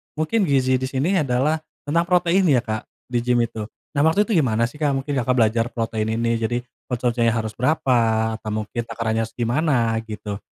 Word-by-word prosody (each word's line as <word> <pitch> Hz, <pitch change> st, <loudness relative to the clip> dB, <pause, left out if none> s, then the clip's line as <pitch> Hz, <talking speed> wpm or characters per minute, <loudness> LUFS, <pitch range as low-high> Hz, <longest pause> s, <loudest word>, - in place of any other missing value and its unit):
mungkin 160 Hz, +8 st, +1 dB
gizi 130 Hz, -2 st, +3 dB
di 130 Hz, -, -2 dB
sini 155 Hz, +9 st, +1 dB
adalah 135 Hz, +4 st, +1 dB, 0.3 s
tentang 165 Hz, +4 st, +2 dB
protein 180 Hz, +1 st, +3 dB
ya, 130 Hz, -4 st, +4 dB
Kak? 110 Hz, -2 st, -4 dB, 0.2 s
Di 120 Hz, -1 st, +1 dB
gim 125 Hz, 0 st, +2 dB
itu. 110 Hz, -2 st, -4 dB, 0.3 s
Nah, 140 Hz, -, +3 dB
waktu 160 Hz, +6 st, +4 dB
itu 225 Hz, -, -6 dB
gimana 115 Hz, -7 st, +2 dB
sih, 150 Hz, -, -14 dB
Kak, 145 Hz, -3 st, +1 dB
mungkin 135 Hz, +2 st, -3 dB
Kakak 125 Hz, 0 st, +1 dB
belajar 115 Hz, -1 st, +3 dB
protein 110 Hz, -1 st, -1 dB
ini 115 Hz, 0 st, +1 dB
jadi 115 Hz, +2 st, -1 dB, 0.3 s
konsumsinya 120 Hz, -2 st, +1 dB
harus 110 Hz, -2 st, -2 dB
berapa? 115 Hz, -5 st, +2 dB
Atau 110 Hz, -, -5 dB
mungkin 120 Hz, +3 st, -4 dB
takarannya 115 Hz, -1 st, -1 dB
harus 115 Hz, -, -14 dB
gimana? 120 Hz, -2 st, +1 dB
Gitu. 105 Hz, -1 st, -6 dB
120 Hz, 190 wpm, -22 LUFS, 115-145 Hz, 0.3 s, ya